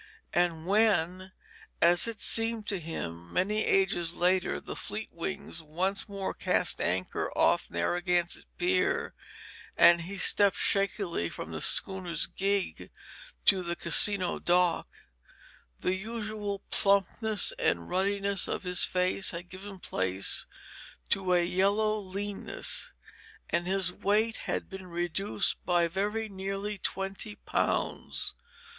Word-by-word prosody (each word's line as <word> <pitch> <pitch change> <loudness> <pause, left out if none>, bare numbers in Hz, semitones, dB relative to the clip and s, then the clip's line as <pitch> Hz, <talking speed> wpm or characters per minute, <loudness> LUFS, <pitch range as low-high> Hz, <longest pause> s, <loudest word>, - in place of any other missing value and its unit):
And 170 -2 +1
when 190 -3 +2 0.5
as 175 +4 +5
it 230 -2 -5
seemed 225 0 0
to 200 - -2
him 85 - -6
many 210 - +1
ages 175 -3 +1
later 180 +1 +1
the - - -7
Fleetwings 190 -4 -5
once 185 +7 -2
more 195 -1 -4
cast - - 0
anchor 90 +1 -1
off - - +3
Narragansett 175 - 0
Pier, 370 +1 +1 0.6
and 170 0 +7
he 195 +4 -7
stepped 200 +1 +4
shakily 195 - 0
from - - -8
the - - -5
schooner's 180 -4 +2
gig 195 +2 -1 0.6
to 190 -2 +6
the 170 -1 -3
Casino 185 +2 +4
dock, 175 -1 +2 0.9
the 180 - 0
usual 210 0 -4
plumpness 200 +1 +2
and 85 -1 0
ruddiness 200 +1 0
of - - -3
his 180 -1 +2
face 185 +1 +2
had 175 +1 -5
given 195 +2 -9
place 95 - -1 0.6
to 190 -2 +1
a 175 -1 +3
yellow 205 +4 +1
leanness, 200 - -3 0.6
and 170 +1 0
his 190 -1 +1
weight 215 +4 +1
had - - -2
been 190 -1 -9
reduced 175 +4 -1
by 175 -1 +2
very 210 +5 -2
nearly 195 +1 -4
twenty 195 +3 -4
pounds. - - -1
190 Hz, 120 wpm, -29 LUFS, 175-200 Hz, 0.9 s, and